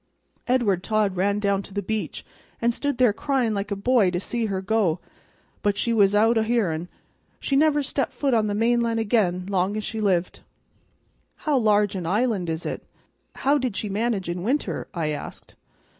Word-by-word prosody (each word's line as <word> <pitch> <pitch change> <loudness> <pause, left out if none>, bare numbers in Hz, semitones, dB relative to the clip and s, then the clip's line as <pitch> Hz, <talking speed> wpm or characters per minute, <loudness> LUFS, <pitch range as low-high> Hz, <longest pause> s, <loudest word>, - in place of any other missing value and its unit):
Edward 235 -8 +2
Todd 210 -2 +1
ran 200 +3 +1
down 200 -1 +1
to 200 0 -12
the 205 - -1
beach, 220 +2 -4 0.3
an' 235 +1 +2
stood 285 +2 -2
there 245 -4 +4
cryin' 250 -1 0
like 200 0 -3
a 200 - -1
boy 215 -1 +3
to 175 0 -2
see 230 +4 -2
her 195 -2 -2
go, 190 -4 +1 0.6
but 205 -1 +1
she 235 +2 0
was 205 -2 +4
out 225 +2 +4
o' - - +2
hearin'. 200 -8 0 0.5
She 275 - -1
never 295 0 +3
stepped 275 0 -2
foot 275 -3 -1
on 220 -2 +2
the 205 - -1
mainland 230 +1 +1
again 205 -5 +1
long 195 +1 0
as 215 - -3
she 220 +1 -4
lived." 185 -4 0 1.1
"How 300 -2 +2
large 210 -4 +3
an 180 -3 -3
island 205 -2 0
is 160 +1 -3
it? - - -4 0.6
How 285 +2 +4
did 250 -6 -2
she 210 - -3
manage 205 -2 -1
in 175 +1 -3
winter?" 255 +10 -1
I 165 -5 -2
asked. 150 -1 -7
210 Hz, 190 wpm, -24 LUFS, 195-235 Hz, 1.1 s, there